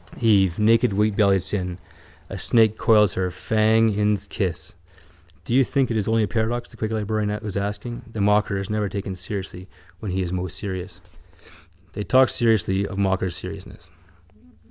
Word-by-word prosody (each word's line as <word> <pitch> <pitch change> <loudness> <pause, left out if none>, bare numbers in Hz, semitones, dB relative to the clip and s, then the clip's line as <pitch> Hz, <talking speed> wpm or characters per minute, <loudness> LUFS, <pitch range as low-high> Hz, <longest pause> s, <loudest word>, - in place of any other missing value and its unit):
Eve. 100 -7 +3
Naked 115 +1 +3
wheatbellied 100 -2 +2
sin. 90 -3 -3 0.5
A - - -7
snake 110 -2 +3
coils 105 -4 +4
her, 90 -1 -1
fang 110 +4 +2
in's 105 -1 0
kiss. 95 -4 -4 0.7
—Do - - -3
you 135 +2 +5
think 130 0 0
it - - -1
is 105 -2 -1
only 110 0 +2
a - - 0
paradox? 120 +2 -2
the - - -15
quaker 110 0 -3
librarian 105 0 -1
was 105 -3 -5
asking. 105 +4 -4
The 110 - -6
mocker 105 0 +2
is 95 0 -4
never 105 -1 -1
taken 100 -1 -4
seriously 95 0 -6 0.3
when 105 - -5
he 95 +1 -1
is 90 0 -4
most 90 -2 -3
serious. 95 -3 -6 0.9
They 105 - -5
talked 130 +3 +4
seriously 105 -5 +1
of 95 - -8
mocker's 95 -2 0
seriousness. 90 -2 -10
105 Hz, 165 wpm, -23 LUFS, 95-110 Hz, 0.9 s, you